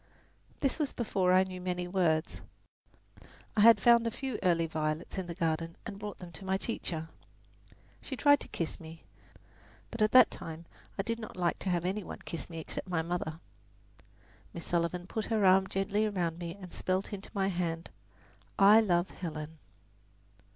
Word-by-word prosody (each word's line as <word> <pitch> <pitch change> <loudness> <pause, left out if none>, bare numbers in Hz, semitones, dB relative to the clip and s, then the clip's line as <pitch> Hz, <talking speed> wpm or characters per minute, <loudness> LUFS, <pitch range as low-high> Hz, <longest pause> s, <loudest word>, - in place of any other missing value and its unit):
This 275 +3 +1
was 295 -3 -1
before 195 -6 +1
I 185 +1 +6
knew 185 -1 -7
many 180 -1 -2
words. 170 -4 0 1.1
I 210 - +3
had 225 -1 +8
found 235 +2 +5
a - - +2
few 255 0 -4
early 170 -2 +3
violets 155 +2 -2
in 185 - -4
the 170 - -5
garden 165 0 -1
and 200 -3 -6
brought 205 -1 -6
them 180 -1 -10
to 170 - -12
my 190 0 0
teacher. 165 -7 -4 0.9
She 265 - -6
tried 285 +1 +5
to - - -6
kiss 165 - -4
me: 160 0 -11 0.9
but 230 - -5
at 215 - +4
that 255 -3 +8
time 165 +1 -8 0.3
I 195 - 0
did 230 +2 -2
not 220 -4 -8
like 175 -1 0
to 195 - -2
have 175 -1 0
any 195 +3 -1
one - - -7
kiss 165 - -6
me 165 - -7
except 160 +3 -6
my 170 -3 0
mother. 165 -2 -3 1.2
Miss 170 - -6
Sullivan 175 +1 -1
put 215 +3 -3
her 220 -3 +1
arm 190 +1 +6
gently 205 +3 0
round 175 -4 -2
me 170 -1 -5
and 185 -3 -10
spelled 185 +1 -1
into 200 0 -7
my 195 -1 +1
hand, 170 -2 -3 0.7
"I 205 +2 +8
love 175 -3 +1
Helen." 155 -2 -6
180 Hz, 180 wpm, -31 LUFS, 170-205 Hz, 1.2 s, had